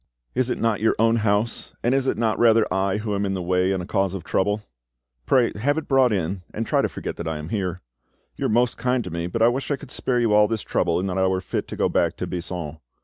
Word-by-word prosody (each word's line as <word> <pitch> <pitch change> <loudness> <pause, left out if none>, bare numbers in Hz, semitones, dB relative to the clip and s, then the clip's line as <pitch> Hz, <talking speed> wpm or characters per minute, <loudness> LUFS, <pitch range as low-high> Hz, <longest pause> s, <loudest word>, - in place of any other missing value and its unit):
"Is 130 0 0
it - - -1
not 115 -3 +1
your 110 - +3
own 115 +1 +3
house, 105 +1 -1
and 120 - +2
is 135 0 +1
it - - +1
not 110 -1 0
rather 115 -1 +5
I 95 +1 +1
who 105 0 -3
am 100 0 0
in 95 -1 -1
the 95 - -3
way 90 +1 +2
and 95 -2 -1
a - - -6
cause 95 -1 0
of 95 - -6
trouble? 105 +4 0 0.6
Pray 125 -3 +4
have 140 +8 0
it 160 - -3
brought 135 -3 +4
in, 95 -1 -1
and 115 - -2
try - - +2
to - - 0
forget - - -6
that 85 - -5
I 80 -1 -2
am 75 +1 -7
here. 95 -4 -2 0.5
You - - -1
are - - -2
most 120 +2 +2
kind 125 0 +1
to 90 - -7
me, 85 +1 -3
but 110 +6 0
I - - +7
wish 130 +3 -1
I 145 - +2
could 135 - -12
spare 125 -2 0
you 115 -3 +2
all 105 0 +6
this 110 -1 -2
trouble 85 -1 0
and 95 - -2
that 95 0 -1
I 95 - +3
were 95 0 +1
fit 95 - -3
to - - -6
go - - +2
back - - +1
to - - -3
Buisson. 85 -3 -5
105 Hz, 280 wpm, -23 LUFS, 95-115 Hz, 0.6 s, I